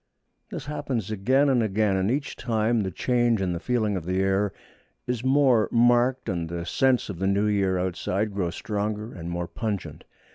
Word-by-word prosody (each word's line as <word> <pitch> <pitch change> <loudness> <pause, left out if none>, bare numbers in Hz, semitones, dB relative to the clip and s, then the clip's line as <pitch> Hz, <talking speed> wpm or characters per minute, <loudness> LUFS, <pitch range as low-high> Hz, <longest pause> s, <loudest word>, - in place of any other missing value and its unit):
This - - -6
happens 135 -8 -3
again 130 +8 +2
and 130 -3 +3
again, 105 -2 +1
and 95 +1 +1
each 140 +4 -2
time 115 -1 0
the 95 - -2
change 120 +4 +1
in 95 -2 -1
the 85 - -3
feeling 110 -1 0
of 90 - -3
the 90 +2 -1
air 95 +1 +1 0.5
is 125 -1 -2
more 130 -4 +3
marked, 120 +2 +3
and 85 -5 -2
the 85 0 -4
scents 130 +5 +2
of 90 -4 -6
the 95 - 0
new 100 +2 +2
year 100 -3 +1
outside 95 +3 -2
grow 95 -3 -1
stronger 105 +4 -3
and 85 -2 -7
more 85 0 -3
pungent. 105 -2 -5
105 Hz, 185 wpm, -25 LUFS, 95-120 Hz, 0.5 s, and